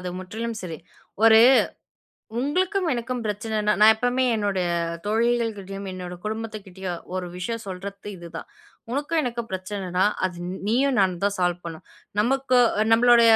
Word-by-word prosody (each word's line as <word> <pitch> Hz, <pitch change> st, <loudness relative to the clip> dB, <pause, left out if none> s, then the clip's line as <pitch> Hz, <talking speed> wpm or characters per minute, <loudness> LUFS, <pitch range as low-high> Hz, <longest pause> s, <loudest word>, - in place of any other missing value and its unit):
அது 180 Hz, -, -5 dB
முற்றிலும் 220 Hz, +4 st, -5 dB
சரி. 165 Hz, -4 st, -6 dB, 0.5 s
ஒரு 220 Hz, -1 st, +8 dB, 1.0 s
உங்களுக்கும், 365 Hz, +7 st, 0 dB
எனக்கும் 245 Hz, +1 st, -3 dB
பிரச்சனைன்னா 210 Hz, 0 st, 0 dB
நான் 220 Hz, +1 st, +9 dB
எப்பவுமே 245 Hz, +2 st, +1 dB
என்னோடைய 200 Hz, -4 st, 0 dB, 0.4 s
தோழிகள்கிட்டயும், 215 Hz, -3 st, -1 dB
என்னோட 180 Hz, -1 st, -6 dB
குடும்பத்துக்கிட்டயும் 200 Hz, -5 st, -5 dB
ஒரு 180 Hz, -1 st, -3 dB
விஷயம் 230 Hz, +5 st, -4 dB
சொல்றத்து 195 Hz, +2 st, -7 dB
இதுதான். 170 Hz, -1 st, -8 dB, 0.4 s
உனக்கும் 295 Hz, +4 st, 0 dB
எனக்கும் 235 Hz, -2 st, -4 dB
பிரச்சனைன்னா 185 Hz, -1 st, -2 dB, 0.2 s
அது 180 Hz, -2 st, -4 dB, 0.3 s
நீயும் 260 Hz, +3 st, +2 dB
நானும் 185 Hz, -1 st, +1 dB
தான் 200 Hz, 0 st, +1 dB
சால்வ் 175 Hz, 0 st, 0 dB
பண்ணணும். 165 Hz, -1 st, -8 dB, 0.4 s
நமக்கு 260 Hz, +1 st, +2 dB, 0.4 s
நம்மளோட 240 Hz, 0 st, +6 dB
215 Hz, 125 wpm, -24 LUFS, 185-240 Hz, 1.0 s, நான்